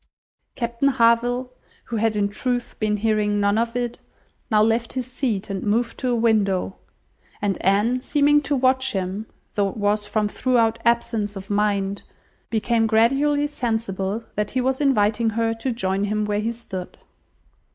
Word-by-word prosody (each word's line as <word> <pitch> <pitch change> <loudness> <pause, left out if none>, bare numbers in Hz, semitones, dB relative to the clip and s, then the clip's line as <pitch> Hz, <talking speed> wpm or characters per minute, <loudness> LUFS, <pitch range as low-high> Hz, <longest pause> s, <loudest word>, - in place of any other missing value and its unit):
Captain 235 +3 0
Harville, 245 0 +2 0.3
who 235 - -4
had 220 0 +1
in 205 -1 +2
truth 245 +4 -3
been 210 -1 +1
hearing 210 -1 +1
none 200 0 +2
of 230 +1 0
it, 240 -1 -2 0.5
now 215 - +3
left 225 +2 +2
his 255 -2 -2
seat, 245 -5 -2
and 195 -1 -4
moved 230 +3 0
to 255 - -2
a 245 - +2
window, 210 -5 +1 0.6
and 200 -3 -1
Anne 210 +7 +2
seeming 295 +2 +3
to 285 0 -1
watch 260 0 +2
him, 195 +3 -3 0.3
though 200 -1 +1
it 195 - -9
was 210 0 0
from 210 0 0
thorough 230 0 +2
absence 230 -3 +1
of 195 +1 -8
mind, 200 -1 0 0.5
became 225 0 +1
gradually 275 +7 +3
sensible 225 -6 -2
that 210 0 -1
he 260 - -1
was 260 +2 0
inviting 225 -4 +2
her 225 +1 0
to 225 +3 -3
join 195 -3 -1
him 210 +1 -1
where 210 0 0
he 225 +2 -1
stood. 190 -6 -7
225 Hz, 160 wpm, -23 LUFS, 205-245 Hz, 0.6 s, now